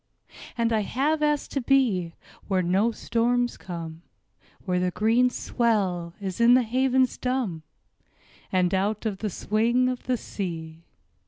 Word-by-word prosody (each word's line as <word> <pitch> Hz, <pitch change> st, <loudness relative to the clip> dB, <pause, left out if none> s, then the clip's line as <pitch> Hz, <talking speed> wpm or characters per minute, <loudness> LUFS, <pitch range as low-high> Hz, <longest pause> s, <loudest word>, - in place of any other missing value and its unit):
And 230 Hz, -1 st, +1 dB
I 220 Hz, -, +3 dB
have 285 Hz, +9 st, 0 dB
asked 295 Hz, -1 st, 0 dB
to 275 Hz, -, -1 dB
be 230 Hz, -11 st, +2 dB, 0.3 s
Where 190 Hz, -2 st, +1 dB
no 195 Hz, +6 st, +2 dB
storms 240 Hz, +2 st, 0 dB
come, 165 Hz, -2 st, -7 dB, 0.6 s
Where 180 Hz, -2 st, 0 dB
the 180 Hz, 0 st, +1 dB
green 225 Hz, +6 st, +2 dB
swell 195 Hz, -9 st, -1 dB
is 195 Hz, +1 st, -4 dB
in 240 Hz, +1 st, +7 dB
the 255 Hz, -, +4 dB
havens 255 Hz, +2 st, +1 dB
dumb, 250 Hz, -10 st, -2 dB, 0.9 s
And 180 Hz, -1 st, +2 dB
out 205 Hz, +3 st, 0 dB
of 205 Hz, -3 st, -2 dB
the 215 Hz, -, -2 dB
swing 235 Hz, +6 st, +1 dB
of 255 Hz, -1 st, -5 dB
the 255 Hz, -1 st, +1 dB
sea. 165 Hz, -6 st, -6 dB
220 Hz, 145 wpm, -25 LUFS, 185-250 Hz, 0.9 s, in